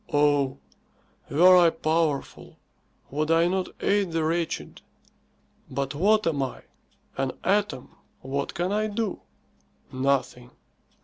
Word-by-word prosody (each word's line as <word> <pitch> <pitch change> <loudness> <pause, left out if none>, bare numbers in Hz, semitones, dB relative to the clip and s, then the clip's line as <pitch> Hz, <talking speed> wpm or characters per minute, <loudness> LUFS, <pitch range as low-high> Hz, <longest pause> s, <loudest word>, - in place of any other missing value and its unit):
"Oh; 145 -2 +2 0.7
were 180 +5 +6
I 175 -2 +6
powerful, 160 -3 -2 0.5
would 150 +3 -1
I 165 +1 +4
not 185 +1 -1
aid 200 -4 +1
the 165 -1 0
wretched? 165 +1 -2 0.9
But 135 +1 -3
what 210 +8 +2
am 155 -4 0
I? 130 - -4 0.5
An 135 -1 -1
atom. 200 -9 -1 0.3
What 140 +2 -4
can 175 +2 -1
I 215 +1 0
do? 215 -1 -3 0.7
Nothing." 130 -2 -1
160 Hz, 115 wpm, -26 LUFS, 140-185 Hz, 0.9 s, were